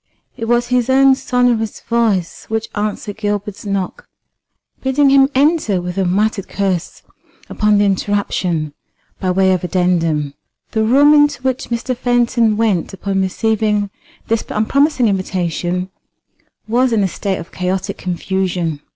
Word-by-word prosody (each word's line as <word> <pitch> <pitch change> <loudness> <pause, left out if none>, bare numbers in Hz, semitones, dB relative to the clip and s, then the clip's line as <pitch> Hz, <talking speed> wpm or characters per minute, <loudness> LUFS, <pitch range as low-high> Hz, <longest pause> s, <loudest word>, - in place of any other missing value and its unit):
It 225 - -5
was 240 +1 +1
his 250 -1 +1
own 270 +1 +5
sonorous 245 -4 0
voice 220 -7 -1
which 220 0 -3
answered 210 0 -3
Gilbert's 205 -1 -3
knock, 195 -2 -3 0.7
bidding 270 +1 +3
him 270 0 +5
enter 280 - +2
with 180 0 -5
a 190 - +1
muttered 200 +2 0
curse 190 -4 -2 0.5
upon 210 -1 +2
the 205 - +3
interruption 185 -6 -1 0.5
by 185 - -1
way 190 +1 +3
of 185 - -2
addendum. 165 -5 0 0.4
The 220 -1 +1
room 280 +6 +5
into 295 -2 +3
which 260 0 -1
Mr. 240 +2 -2
Fenton 240 -3 +1
went 210 -6 0
upon 195 0 -1
receiving 210 +1 0 0.4
this 225 0 0
unpromising 265 +4 +2
invitation 180 -1 -2 0.8
was 245 +3 +2
in 220 -3 +2
a - - +2
state 190 +1 -3
of 170 - -9
chaotic 185 +1 -3
confusion. 180 -3 -2
210 Hz, 135 wpm, -17 LUFS, 185-240 Hz, 0.8 s, own